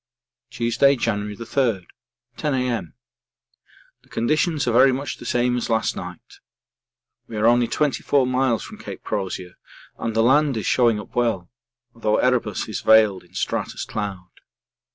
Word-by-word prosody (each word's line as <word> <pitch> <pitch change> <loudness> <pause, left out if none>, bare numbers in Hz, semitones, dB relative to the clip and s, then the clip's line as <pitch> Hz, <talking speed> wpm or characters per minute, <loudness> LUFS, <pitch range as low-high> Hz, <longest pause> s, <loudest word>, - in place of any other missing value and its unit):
Tuesday, 120 +3 +2
January 105 -4 -2
3, 115 -4 -1 0.5
10 150 - -1
A.M. 120 -9 -2 1.1
The - - -27
conditions 150 +6 0
are - - +3
very 130 +3 +6
much 135 +1 -3
the 120 - -9
same 120 +1 +1
as 120 - -3
last 115 -1 +1
night. 90 -1 -9 0.9
We 110 - -7
are 105 - +1
only 120 0 +4
24 140 0 +1
miles 130 -2 +1
from - - -10
C. - - -7
Crozier 95 -3 -5 0.4
and 115 -1 -3
the 115 - +3
land 135 +1 +3
is 110 - -3
showing 120 -4 +3
up - - -11
well, 115 -7 0 0.4
though 110 -2 0
Erebus 120 -5 0
is 110 - -4
veiled 110 -4 +5
in 90 - -23
stratus - - -3
cloud. 95 -4 -5
115 Hz, 150 wpm, -22 LUFS, 105-125 Hz, 1.1 s, very